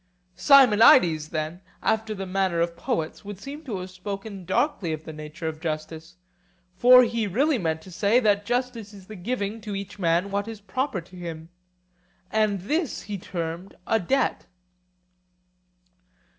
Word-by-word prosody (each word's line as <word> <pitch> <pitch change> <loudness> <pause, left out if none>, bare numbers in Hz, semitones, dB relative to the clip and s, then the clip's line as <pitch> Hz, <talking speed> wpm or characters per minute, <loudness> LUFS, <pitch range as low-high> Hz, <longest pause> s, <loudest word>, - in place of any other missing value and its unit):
Simonides, 195 - +6
then, 155 +3 -4 0.2
after 220 -1 0
the 195 -1 -5
manner 190 -2 0
of 170 0 0
poets, 160 0 -3
would 205 -2 -8
seem 285 +8 -8
to 230 -9 -4
have 185 0 -7
spoken 195 +1 -7
darkly 190 - 0
of 155 0 -6
the 160 - -8
nature 155 +2 -7
of 155 -1 -4
justice; 160 +1 -5 0.6
for 250 +5 +8
he 230 -2 -1
really 270 - +1
meant 160 -3 -2
to 185 - -12
say 205 +7 +3
that 205 -4 +2
justice 240 -2 -3
is 195 -2 -13
the 215 - -10
giving 210 +2 -3
to 205 -1 -5
each 200 0 -7
man 175 +2 +1
what 200 +1 -1
is 225 -2 -7
proper 205 +1 -2
to 175 +2 -17
him, 165 -2 -7 0.8
and 215 -3 +1
this 300 - -2
he 205 0 -5
termed 170 +1 -5
a 225 - +2
debt. 265 +9 0
195 Hz, 155 wpm, -25 LUFS, 170-220 Hz, 0.8 s, for